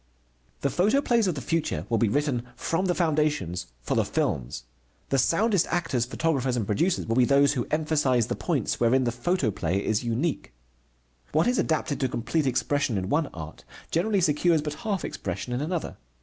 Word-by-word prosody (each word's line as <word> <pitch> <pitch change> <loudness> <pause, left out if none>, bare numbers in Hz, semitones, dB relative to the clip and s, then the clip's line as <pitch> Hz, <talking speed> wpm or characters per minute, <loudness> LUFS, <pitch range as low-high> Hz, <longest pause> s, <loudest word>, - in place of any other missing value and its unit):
The 140 - 0
photoplays 225 - +2
of 180 - 0
the 135 - -4
future 155 - -1
will 115 0 +1
be 115 - +3
written 140 0 0
from 165 +3 -1
the 175 -2 +1
foundations 150 - 0
for - - -2
the - - +3
films. - - -2 0.5
The 135 - +2
soundest 195 - +2
actors, 165 -9 0
photographers, 135 -2 0
and 110 - -1
producers 170 - 0
will 115 +2 -1
be 130 - +6
those 140 +2 +4
who 125 -4 -2
emphasize 150 -6 +2
the - - -3
points - - -1
wherein 125 +3 +3
the 120 - 0
photoplay 120 - -1
is 110 +3 0
unique. 120 - -2 0.8
What 155 +2 +3
is 245 +1 +2
adapted 155 -2 0
to 130 - 0
complete 135 +5 -1
expression 130 -2 0
in 95 0 -3
one 150 0 +1
art 80 -2 -9 0.3
generally 195 +4 +1
secures 160 0 +2
but 150 -1 -3
half 205 -6 -2
expression 125 - -4
in 125 - -1
another. 165 +2 -3
145 Hz, 180 wpm, -26 LUFS, 120-165 Hz, 0.8 s, be